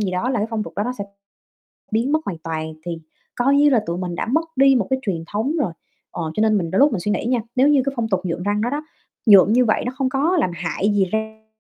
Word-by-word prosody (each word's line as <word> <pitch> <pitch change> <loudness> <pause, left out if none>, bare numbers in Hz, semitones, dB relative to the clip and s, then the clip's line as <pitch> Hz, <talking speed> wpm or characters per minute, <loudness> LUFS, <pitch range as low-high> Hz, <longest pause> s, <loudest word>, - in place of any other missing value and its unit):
gì 200 -3 -1
đó 185 +7 -1
là 245 - 0
cái 215 - 0
phong 220 -2 -1
tục - - -9
đó 205 - 0
nó 250 - -2
sẽ 200 - -3 0.9
biến 230 +5 0
mất 310 - +3
hoàn 175 -5 -4
toàn, 160 -1 -5
thì 175 - -3 0.4
coi 270 +3 +2
như 290 +1 +5
là 240 -6 +2
tụi 170 +1 -3
mình 180 -1 -4
đã - - -2
mất 320 +8 0
đi 270 0 +6
một 215 -7 +1
cái 265 0 0
truyền 175 -8 -3
thống 220 +8 -2
rồi. 180 -11 -2 0.4
Ờ, 160 -2 -4
cho 215 - 0
nên 215 -1 +3
mình 165 -3 -2
đôi 190 - +1
lúc 285 0 +5
mình 205 - -1
suy 210 - -2
nghĩ 210 - -1
nha, 245 0 +1 0.2
nếu 265 +3 +4
như 290 -3 +4
cái 275 - -1
phong 230 -2 -1
tục 190 - +1
nhuộm 175 0 -3
răng 205 +1 0
đó 235 - 0
đó, 290 +3 -2 0.4
nhuộm 205 -1 +7
như 250 0 +4
vậy 215 - +1
nó 250 - -2
không 265 -1 0
có 300 +7 +1
làm 180 - +1
hại 180 +4 -1
gì 195 -2 +3
răng 220 0 -4
220 Hz, 290 wpm, -21 LUFS, 185-260 Hz, 0.9 s, nhuộm